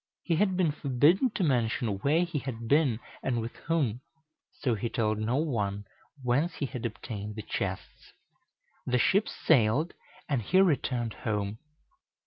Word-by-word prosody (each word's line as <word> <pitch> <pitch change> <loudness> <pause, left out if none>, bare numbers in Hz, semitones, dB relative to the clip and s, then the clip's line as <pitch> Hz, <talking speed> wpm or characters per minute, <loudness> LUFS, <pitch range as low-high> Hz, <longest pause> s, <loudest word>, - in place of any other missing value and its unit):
He 165 -3 +1
had 190 -1 +2
been 175 -5 +3
forbidden 150 - +3
to 195 - 0
mention 115 - +1
where 150 - +3
he 170 -4 -2
had 115 -4 -6
been 140 -4 +3 0.2
and 120 -3 0
with 115 +1 -5
whom; 135 -9 +1 0.5
so 125 -4 -1
he 115 +2 -2
told 110 -2 0
no 110 +3 0
one 105 -9 -1 0.4
whence 135 +8 +1
he 140 - -2
had 125 -3 -3
obtained 105 -2 -7
the 110 - -6
chests. - - -5 0.8
The 125 - +2
ships 200 - +3
sailed, 140 +3 +2 0.3
and 140 -5 0
he 185 - +3
returned 125 - +2
home. 105 -1 -3
125 Hz, 150 wpm, -29 LUFS, 110-155 Hz, 0.8 s, been